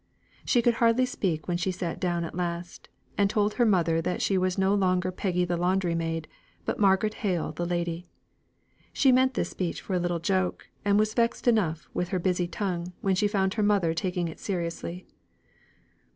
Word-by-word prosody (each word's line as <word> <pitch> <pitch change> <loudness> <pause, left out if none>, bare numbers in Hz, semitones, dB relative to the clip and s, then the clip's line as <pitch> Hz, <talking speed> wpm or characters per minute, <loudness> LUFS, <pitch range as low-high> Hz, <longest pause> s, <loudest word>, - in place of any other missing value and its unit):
She 240 -2 +3
could 240 - +4
hardly 230 +2 +4
speak 175 -10 -2
when 175 -1 0
she 180 +2 -1
sat 175 -2 -4
down 175 -2 0
at 165 - -5
last, 175 0 -4 0.3
and 200 -1 +4
told 210 0 +1
her 240 -2 +3
mother 165 -5 +2
that 180 - -2
she 195 - +1
was 185 0 +1
no 190 +1 +3
longer 185 -2 +1
Peggy 180 -1 0
the 175 0 -1
laundry 180 0 +1
maid, 165 -1 -2 0.4
but - - -2
Margaret 200 +1 +3
Hale 180 -6 0
the 175 - -3
lady. 175 0 -2 0.9
She 270 - +4
meant 260 +1 +3
this - - -1
speech 180 -3 -3
for 195 - -5
a 180 - +2
little 175 0 0
joke, 185 +2 -1
and 205 0 +3
was 215 0 +2
vexed 235 +1 0
enough 175 -10 +2
with 180 - -2
her 185 - 0
busy 180 -1 0
tongue 180 -1 -3
when 195 - +2
she 195 +3 +2
found 195 -2 0
her 220 - -1
mother 200 -6 +2
taking 175 +1 -1
it 160 - -8
seriously. 175 -1 -4
185 Hz, 195 wpm, -27 LUFS, 175-205 Hz, 0.9 s, could